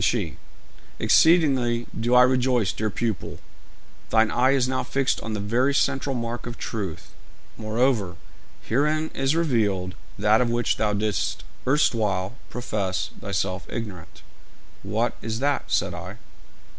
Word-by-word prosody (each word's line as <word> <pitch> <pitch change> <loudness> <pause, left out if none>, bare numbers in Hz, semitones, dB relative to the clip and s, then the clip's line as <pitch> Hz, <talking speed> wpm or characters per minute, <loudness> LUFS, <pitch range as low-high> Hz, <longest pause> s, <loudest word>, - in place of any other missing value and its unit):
Then - - +3
she: - - -1 0.6
'Exceedingly 135 -8 +4
do 120 +2 +2
I 125 - +8
rejoice, 125 -5 +2
dear 110 0 -1
pupil; 110 -2 -3 0.7
thine 110 -1 +3
eye 130 +1 +3
is 130 -2 +2
now 130 0 0
fixed 135 -1 0
on 110 - -4
the 105 - -2
very 120 +7 +1
central 135 0 +1
mark 120 0 -4
of 120 - -6
truth. 100 -8 -5 0.4
Moreover, 110 -4 0 0.5
herein 150 +6 0
is 135 +3 +1
revealed 105 - +1 0.2
that 105 +3 +4
of 120 - +1
which 120 0 0
thou 105 -1 +1
didst 105 -2 -1 0.2
erstwhile 110 -8 +1
profess 105 -6 -2
thyself 95 -1 -2
ignorant.' 100 -8 -7 0.6
'What 110 +5 -1
is 110 -1 -3
that?' 140 +3 0
said - - +1
I. - - -7
115 Hz, 135 wpm, -24 LUFS, 105-130 Hz, 0.7 s, I